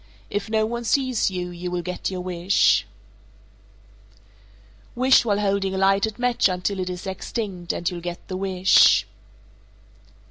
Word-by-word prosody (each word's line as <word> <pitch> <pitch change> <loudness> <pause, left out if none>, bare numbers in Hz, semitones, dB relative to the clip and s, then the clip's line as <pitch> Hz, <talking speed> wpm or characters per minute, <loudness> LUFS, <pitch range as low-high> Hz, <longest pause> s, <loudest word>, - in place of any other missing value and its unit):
If 205 +1 -3
no 220 0 +1
one 235 +2 -4
sees 255 -2 +1
you, 180 -1 -5
you 175 +1 -6
will 175 -1 -3
get 180 0 -4
your 185 -1 -5
wish. 180 +1 +2 2.1
451. - - -11
Wish 260 -1 +5
while 205 -2 +1
holding 195 -1 0
a - - -2
lighted 195 +3 +2
match 245 -4 +2
until 185 +2 -2
it 185 0 -3
is 180 +1 -6
extinct, 190 -2 -4
and 175 - -4
you'll 175 -2 -3
get 175 0 -7
the 185 - -5
wish. 190 0 +4
190 Hz, 150 wpm, -23 LUFS, 180-215 Hz, 2.1 s, Wish